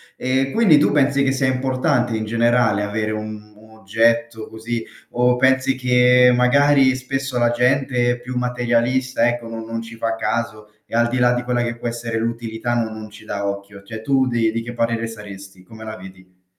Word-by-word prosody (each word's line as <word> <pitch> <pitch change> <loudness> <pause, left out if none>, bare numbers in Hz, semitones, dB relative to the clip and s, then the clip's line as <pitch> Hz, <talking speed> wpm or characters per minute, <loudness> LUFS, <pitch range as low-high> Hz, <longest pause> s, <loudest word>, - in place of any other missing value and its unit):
E 130 +1 -1
quindi 200 -7 +5
tu 145 - +3
pensi 140 -1 +2
che 135 - +2
sia 135 0 0
importante 130 -1 0
in 110 0 -3
generale 115 -2 +2
avere 105 +1 -2
un 110 0 -7
un 110 +1 -18
oggetto 115 +2 0
così? 115 +1 -5 0.3
O 125 0 +2
pensi 130 +1 +2
che, 125 0 +4
magari, 135 +1 +4
spesso 135 0 -4
la 120 0 +3
gente 125 0 +1
è 120 - -3
più 125 +1 -6
materialista, 125 0 0
ecco, 120 -1 -2
no 115 0 -7
non 115 0 -5
ci 115 0 -10
fa 115 0 -1
caso 110 -1 -3 0.2
e - - -7
al 120 0 +3
di 125 - -2
là 125 0 +3
di 120 - -1
quella 120 0 -1
che 120 0 -3
può 120 - -5
essere 115 -1 -4
l'utilità, 115 0 -3
no 115 -2 -1
non 110 0 -8
ci 105 - -15
dà 100 0 -3
occhio? 100 0 -8
Cioè 110 +1 -8
tu 135 +1 +2
di 115 -2 +1
di 115 - -3
che 120 +1 -7
parere 115 -1 -1
saresti? 100 -4 -11
Come 110 +3 -13
la 110 0 -7
vedi? 95 -1 -15
120 Hz, 200 wpm, -20 LUFS, 110-125 Hz, 0.3 s, quindi